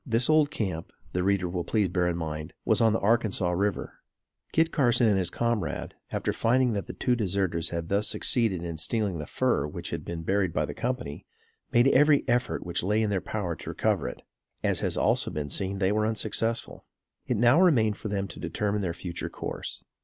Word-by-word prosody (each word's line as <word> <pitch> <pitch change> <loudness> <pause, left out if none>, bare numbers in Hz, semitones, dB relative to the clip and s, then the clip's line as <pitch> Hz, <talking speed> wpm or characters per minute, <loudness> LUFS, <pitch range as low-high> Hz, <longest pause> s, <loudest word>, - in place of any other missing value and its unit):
This 120 +2 +1
old 155 -2 +4
camp, 95 - -4 0.2
the 90 - 0
reader 95 -1 +1
will 85 0 -3
please 105 +2 +1
bear 90 0 +1
in 85 -1 -1
mind, 75 -2 -5
was - - +3
on 115 -1 +5
the 110 - +1
Arkansas 105 -4 +1
River. 100 +2 -2 0.5
Kit 165 0 +2
Carson 120 -5 +3
and 100 -3 +3
his 90 -2 +1
comrade, 115 +1 -2 0.2
after - - -1
finding 125 +1 +2
that 100 -2 -3
the - - -6
two 125 - +1
deserters 95 -6 0
had 85 -1 -4
thus 100 +3 +1
succeeded 110 -8 +2
in 85 -2 -5
stealing 100 -1 -1
the 75 - -6
fur - - +1
which 75 - -6
had - - -4
been 85 -1 -5
buried 95 -1 +1
by - - +1
the - - -6
company, 120 - -4 0.4
made 120 +2 +5
every 145 +1 +5
further 120 - +1
effort 125 +1 -1
which 85 0 -1
lay 105 +4 +1
in 105 - 0
their 95 -2 0
power 95 -3 -3
to - - -8
recover - - 0
it. - - -11 0.4
As - - +1
has - - -1
also - - +2
been 75 -2 -4
seen, 95 0 -1
they 95 0 +1
were 105 +1 +1
unsuccessful. 110 +1 -1 0.4
It 125 - 0
now 120 - +5
remained 115 - +4
for - - -6
them 100 -1 -2
to - - -10
determine 105 0 -1
their 90 -4 -2
future 85 0 -5
course. - - -6
100 Hz, 210 wpm, -27 LUFS, 90-115 Hz, 0.5 s, on